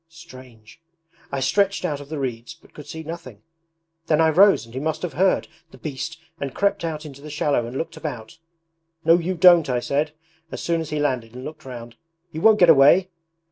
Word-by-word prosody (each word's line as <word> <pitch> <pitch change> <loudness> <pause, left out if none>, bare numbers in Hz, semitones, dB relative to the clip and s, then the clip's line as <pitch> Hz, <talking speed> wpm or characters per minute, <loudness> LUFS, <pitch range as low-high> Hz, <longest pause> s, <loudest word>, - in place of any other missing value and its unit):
Strange! 130 -6 -15 0.5
I 140 - -2
stretched 200 +7 +1
out 150 -5 -2
of 140 - -12
the 155 - -4
reeds 120 -4 -5
but - - -23
could 150 - -11
see 160 0 -7
nothing; 155 -10 -9 0.6
then 155 -1 +2
I 160 0 +5
rose 195 - +5
and 115 - -16
he 130 - -4
must 155 +4 -3
have 175 -5 -3
heard, 185 +6 +2 0.2
the - - -15
beast, 155 +2 -6 0.2
and 135 -2 -5
crept 200 -3 0
out 160 -2 -4
into 140 -2 -11
the 150 - -9
shallow 145 -5 0
and 125 +3 -6
looked 165 +2 -5
about. 120 -5 -7 0.7
"No, 165 +2 +6
you 180 +2 -2
don't!" 175 -3 +6
I 125 -1 +1
said, 145 +4 -1 0.4
as - - -6
soon 170 -1 -1
as 160 - -6
he 150 - -3
landed 125 -6 -2
and 125 - -8
looked 155 -1 -9
round, 120 -2 -9 0.3
"you 160 - -6
won't 220 +1 +6
get 175 - +5
away!" 160 +6 +5
150 Hz, 210 wpm, -22 LUFS, 130-165 Hz, 0.7 s, No